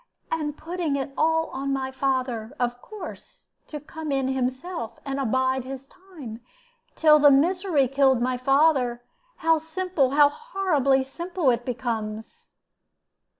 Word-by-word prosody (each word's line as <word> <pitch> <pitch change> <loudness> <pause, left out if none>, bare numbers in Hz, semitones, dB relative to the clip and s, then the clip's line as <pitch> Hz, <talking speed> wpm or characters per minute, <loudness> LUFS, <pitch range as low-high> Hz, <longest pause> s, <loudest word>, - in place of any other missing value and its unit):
And 300 -2 -2
putting 335 -3 -2
it 275 0 -3
all 320 +1 +2
on 275 +1 -3
my 265 -1 -2
father, 255 -3 -2
of 245 0 -1
course, 430 -2 -10 0.2
to 300 - -6
come 310 +1 -7
in 270 -1 0
himself, 260 +1 -3
and 275 0 -3
abide 260 +1 +1
his 265 +1 -7
time, 290 - -11 0.5
till 305 -1 +6
the 290 0 +7
misery 320 0 +3
killed 270 -1 +3
my 250 +1 0
father. 260 -2 +2 0.3
How 325 0 +2
simple, 325 -3 0
how 290 +1 +5
horribly 300 - +1
simple, 340 +1 -1
it 240 0 -2
becomes!" 225 -3 -5
275 Hz, 135 wpm, -25 LUFS, 255-320 Hz, 0.5 s, the